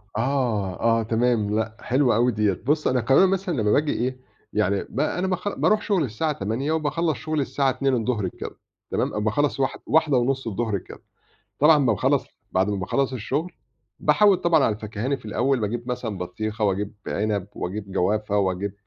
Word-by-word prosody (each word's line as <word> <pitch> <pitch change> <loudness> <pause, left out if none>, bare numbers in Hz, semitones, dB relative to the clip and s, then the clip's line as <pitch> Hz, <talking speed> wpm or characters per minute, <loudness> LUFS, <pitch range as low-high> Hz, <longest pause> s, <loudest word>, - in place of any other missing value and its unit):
آه، 115 -6 0 0.2
آه - - -1
تمام، 115 -2 +1
لأ 110 0 -2
حلوة 130 -2 +2
أوي 120 +2 +3
ديّة، 105 -3 +1
بُص 150 +2 +1
أنا 125 -2 +2
كمان 135 +11 +5
مثلًا 190 -2 -1
لمّا 105 0 +2
باجي 150 0 +2
إيه، 130 +2 -2 0.3
يعني 100 +1 +1
ب 130 - -5
أنا 180 +5 0
باخ 185 +1 -2
بارُوح 215 -1 +3
شغلي 190 -8 +1
الساعة 130 +8 -1
08:00 125 +5 -2
وباخلَّص 160 0 0
شغلي 155 -2 -2
الساعة 135 0 0
14:00 125 -6 0
كده - - -8 0.3
تمام، 105 - -1
باخلَّص 135 +6 0
واح 135 - 0
واحدة 150 -4 +3
ونُص 135 +1 0
الضُهر 110 -1 -1
كده، - - -12 0.6
طبعًا 150 +1 +6
لمّا 125 -5 +3
باخلَّص 100 - +1 0.3
بعد 95 +2 +2
ما 100 - -1
باخلَّص 130 +8 -1
الشغل، 145 +9 -2 0.5
باحوِّد 205 -3 +4
طبعًا 160 -5 +3
على 105 - +2
الفاكهاني 110 +5 -3
في 125 - -19
الأول 125 +4 0
باجيب 120 +4 -3
مثلًا 115 -5 -3
بطيخة، 110 +4 -3
واجيب 100 +1 -1
عنب 105 -2 -1
واجيب 100 +2 -5
جوافة 105 +2 +1
واجيب 95 0 -1
120 Hz, 175 wpm, -24 LUFS, 105-145 Hz, 0.6 s, طبعًا